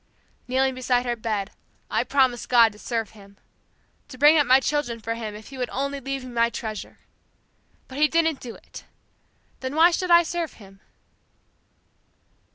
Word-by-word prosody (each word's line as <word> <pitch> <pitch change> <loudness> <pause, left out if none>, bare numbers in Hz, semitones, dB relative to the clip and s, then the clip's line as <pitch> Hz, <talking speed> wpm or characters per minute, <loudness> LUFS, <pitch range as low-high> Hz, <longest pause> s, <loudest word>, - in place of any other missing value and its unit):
Kneeling 265 +1 +1
beside 250 -1 0
her 240 -1 -1
bed 215 -3 -3 0.4
I - - +1
promised 260 -4 +1
God 235 -2 +6
to 210 - -17
serve 225 -2 -3
Him; 200 -2 -17 0.7
to 255 - -12
bring 295 +4 +6
up 295 -4 +3
my 260 +1 +6
children 270 -4 -2
for 230 +1 -3
Him 220 -2 -6
if 210 0 -11
He 270 -1 -10
would 250 - -2
only 280 +1 -3
leave 270 0 -4
me 255 - -9
my 235 -1 +2
treasure. 220 -2 -7 0.9
But 265 +2 -8
He 305 - +5
didn't 325 -2 +1
do 240 -2 -9
it - - -13 0.8
Then 260 +2 -5
why 335 +3 +6
should 365 +1 -2
I 345 0 +7
serve 340 0 -4
Him?' 195 -2 -16
255 Hz, 170 wpm, -24 LUFS, 230-280 Hz, 0.9 s, I